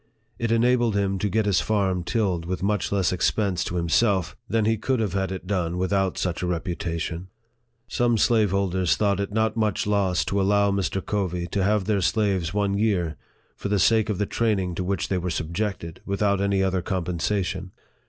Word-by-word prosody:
It 115 -1 -1
enabled 120 -1 +3
him 100 -1 0
to 105 - 0
get 110 +3 +1
his 100 -3 +2
farm 95 -4 0
tilled 90 -4 -1
with 95 +1 -3
much 105 +1 0
less 95 -4 +1
expense 95 0 0
to 90 - -4
himself 90 +2 +1
than 115 -2 +1
he 110 +1 +3
could 125 +4 -1
have 105 -5 -1
had 95 -1 -1
it 95 -1 -6
done 90 -3 -1
without 95 0 0
such 85 -3 -2
a 90 - -1
reputation. 85 0 -3 0.6
Some 120 -1 +1
slaveholders 100 -6 +2
thought 100 -2 +1
it 100 0 -2
not 110 +1 +1
much 110 -2 0
loss 100 -3 +1
to 100 0 0
allow 100 +1 +3
Mr. 95 -1 -1
Covey 90 -4 -1
to 95 +2 0
have 105 0 +2
their 105 -1 +1
slaves 95 -5 +1
one 100 0 0
year, 90 -8 +1 0.4
for 100 - -5
the 105 - +2
sake 110 +2 +3
of 105 - -1
the 105 - 0
training 100 -5 0
to 90 - -3
which 95 +2 -1
they 95 - 0
were 90 +1 -3
subjected, 85 +1 -3
without 100 0 +1
any 100 -1 +1
other 95 -1 0
compensation. 90 +1 -2
100 Hz, 190 wpm, -24 LUFS, 90-105 Hz, 0.6 s, enabled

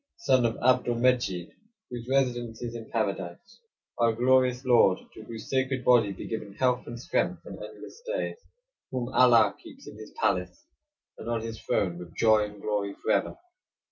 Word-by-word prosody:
Son 130 - +3
of 115 - -4
Abdul 125 -1 +3
Medjid, 120 -8 +1 0.4
whose 120 -1 -6
residence 120 -4 0
is 120 -1 -4
in 115 -1 -8
Paradise; 100 -6 -3 0.4
our 115 -1 +3
glorious 125 +2 +2
Lord, 115 -7 +5 0.2
to - - -11
whose 115 -1 -8
sacred 130 -1 -1
body 120 -5 +5
be 95 - -7
given 105 -3 -5
health, 125 -1 +1
and 120 0 -7
strength, - - -1
and - - -9
endless 465 - -10
days; - - -2 0.5
whom 125 -2 -3
Allah 115 -5 +5
keeps - - -14
in - - -10
his - - -10
palace, 90 -1 -1 0.5
and - - -6
on 115 -1 -1
his 115 0 -7
throne 90 -3 -1
with 85 -2 -11
joy 110 -2 +4
and 105 0 -11
glory, 100 -1 -2
forever. - - 0
115 Hz, 170 wpm, -27 LUFS, 105-125 Hz, 0.5 s, Lord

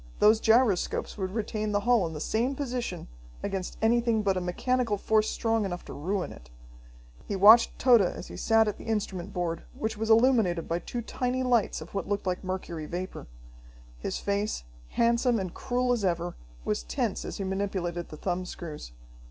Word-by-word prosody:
Those 215 +1 +5
gyroscopes 225 -4 +2
would 190 -3 -3
retain 215 -1 -2
the 205 - +2
hull 235 -5 +3
in 160 - -7
the 150 - -5
same 235 - 0
position 245 - -4 0.4
against 195 -2 -3
anything 230 -1 +3
but 195 -2 +2
a 185 - -1
mechanical 230 +5 0
force 215 +1 +2
strong 225 -1 0
enough 180 -3 -4
to - - -8
ruin 185 +6 -2
it. - - -13 0.8
He 200 - -2
watched 210 +5 +7
Tode 245 -4 +6
as 180 - -2
he - - -9
sat 225 -1 +3
at 210 - -3
the - - -10
instrument 200 -4 -2
board, 175 -3 -2 0.2
which 220 0 -2
was 220 +1 -2
illuminated 220 -7 +4
by 170 +1 -1
two 240 +6 -5
tiny 250 +2 -1
lights 240 -9 +1
of 160 - -10
what 195 - -3
looked 205 -1 -1
like 185 0 -2
mercury 180 -4 -4
vapor. 180 +3 -5 0.7
His - - -3
face, 200 - -1 0.3
handsome 235 0 +2
and 185 -3 -4
cruel 250 0 0
as 240 -4 +1
ever, 175 -1 -1 0.3
was - - 0
tense - - -2
as - - -5
he 195 - -3
manipulated 190 -3 -2
the 155 - -9
thumb 180 +1 -2
screws. 155 - -8
205 Hz, 185 wpm, -28 LUFS, 180-230 Hz, 0.8 s, watched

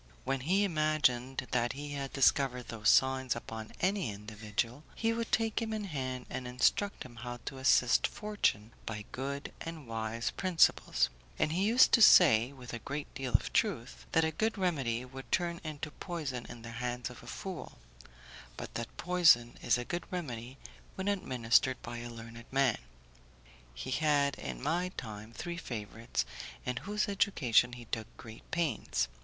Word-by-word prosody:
When 135 - 0
he 185 +10 +2
imagined 155 -7 +1
that 120 -1 +1
he 145 +1 -6
had 140 -1 -4
discovered 130 -2 +2
those 110 -2 +1
signs 130 -1 +4
upon 110 -1 -7
any 190 - +1
individual, 105 +5 -4
he 225 0 +1
would 230 0 -3
take 225 0 +1
him 220 -1 -2
in 215 -1 -2
hand 130 -8 -4
and 125 - -5
instruct 125 +11 +1
him 120 -2 -13
how 120 0 -5
to 135 - -5
assist 130 -2 +4
fortune 200 - -1 0.2
by 105 -2 -4
good 140 +2 -4
and 165 -3 -7
wise 115 0 -2
principles; 185 -3 +3 0.3
and 155 - +1
he 185 +5 +1
used 240 +4 +6
to 230 - +6
say, 130 - +8
with 125 -3 -10
a 120 - -3
great 140 +5 -5
deal 130 -2 -4
of - - +2
truth, - - -1
that 165 - +5
a 160 - 0
good 220 +7 0
remedy 135 -11 0
would 135 +1 -10
turn 170 -1 0
into 150 -1 -5
poison 150 -10 -5
in 120 -2 -9
the 120 - -7
hands 125 0 -2
of 125 - -12
a - - -14
fool, 185 -4 -6 0.8
but - - -7
that 115 -1 -5
poison 165 -10 +4
is - - +3
a 120 - -4
good 175 +3 -3
remedy 130 -8 -5 0.4
when 190 +1 -3
administered 130 - +2
by 120 0 -5
a 120 0 -6
learned 115 0 -10
man. 135 -4 +3 1.0
He - - -5
had, 145 -2 +3
in - - -6
my 175 +5 +1
time, 110 -1 -7
three 170 +8 -5
favourites 115 -5 -3 0.4
in 125 -1 -2
whose 210 - -1
education 130 - +3
he 120 -1 -8
took 110 0 -4
great 110 -2 -12
pains. 140 - 0
130 Hz, 170 wpm, -32 LUFS, 120-165 Hz, 1.0 s, say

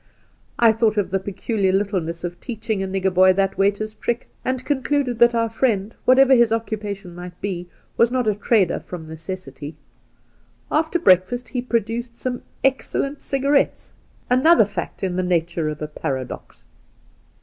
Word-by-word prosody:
' - - -37
I 230 -2 +6
thought 220 -1 +1
of 200 -3 0
the 195 - +1
peculiar 195 +1 -1
littleness 185 -4 -1
of 175 0 -5
teaching 220 -4 -3
a 195 - -2
nigger 190 0 -1
boy 185 +1 +6
that 195 0 0
waiter's 205 +2 +1
trick, 240 +2 -3 0.2
and 255 -1 -2
concluded 275 -3 0
that 235 0 +5
our 230 0 +2
friend, 225 -2 0
whatever 265 +1 +6
his 235 -3 +5
occupation 210 -4 -3
might 175 0 -9
be, 180 -3 -4 0.3
was 235 - +5
not 250 -2 0
a 215 - +3
trader 205 -2 +2
from 165 -3 -9
necessity. 160 -3 -7 1.0
After 315 +3 +1
breakfast 240 - +3
he 250 - -2
produced 235 0 -2
some 250 -1 -3 0.2
excellent 275 +1 0
cigarettes 275 +1 0 0.2
— - - -35
another 320 -2 +6
fact 200 - -6
in 185 -2 -1
the - - +2
nature 170 -3 0
of 150 0 -5
a - - -3
paradox. 135 -4 -6
210 Hz, 160 wpm, -22 LUFS, 185-240 Hz, 1.0 s, I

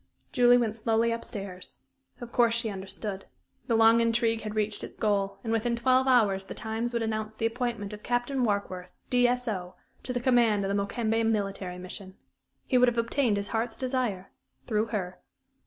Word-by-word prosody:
Julie 245 0 +6
went 225 -3 0
slowly 225 +1 +1
up 230 - -4
stairs. 195 -3 -7 0.4
Of 240 -1 -8
course 235 -2 +3
she 230 -2 -1
understood. 195 +1 -5 0.4
The 230 - +2
long 225 +1 +6
intrigue 230 0 +1
had 215 0 -5
reached 210 -1 -1
its - - -8
goal, 200 -2 0
and 225 -1 -1
within 235 +1 +1
twelve 255 +2 +3
hours 205 -7 +3
the - - -8
Times 225 +1 -3
would 235 -1 -1
announce 220 -1 -3
the 225 - -2
appointment 230 -3 -2
of 210 - -8
Captain 245 +3 0
Warkworth, 200 -4 -2 0.2
D.S.O., 245 -7 +1 0.3
to - - -5
the 245 - -1
command 235 -5 +3
of 195 +1 0
the 200 - +1
Mokembe 225 +2 0
military 195 -4 -2
mission. 185 +1 -8 0.5
He 255 - +3
would 250 - +6
have 240 -1 +1
obtained 230 -1 +1
his 200 0 -4
heart's 225 0 -2
desire 250 -8 -2 0.3
through 220 -1 0
her. 190 -5 -4
225 Hz, 180 wpm, -28 LUFS, 200-240 Hz, 0.5 s, Julie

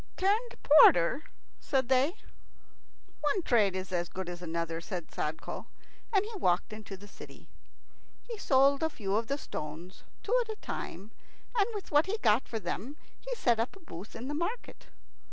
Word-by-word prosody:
"Turned 425 +6 +1
porter?" 275 - +7 0.3
said 265 -3 0
they. 265 +7 +3 1.0
"One 300 +5 0
trade 210 -9 +3
is 185 0 -4
as 175 -2 -1
good 185 -1 -5
as 175 0 -6
another," 165 -1 -3
said 175 -1 -6
Sadko, 155 +2 -4 0.4
and 400 -2 +3
he 445 +1 -7
walked 180 - +1
into 210 -2 -8
the 205 +2 -13
city. - - -13 0.8
He 475 - -4
sold 275 -2 +4
a 320 - +2
few 200 -9 -2
of 225 +1 0
the 280 - -1
stones, 165 - -7 0.2
two 460 - +1
at 460 - -5
a - - -4
time, 205 +4 -6 0.4
and 415 -3 +4
with 405 - -6
what 295 +3 +4
he 425 +4 -1
got 220 +2 +4
for 225 - -3
them 260 +7 -4 0.2
he - - -4
set 240 - +2
up 230 +9 -1
a - - -13
booth 200 - -10
in 235 +3 -6
the 290 - -3
market. 345 +10 -4
240 Hz, 175 wpm, -31 LUFS, -, 1.0 s, porter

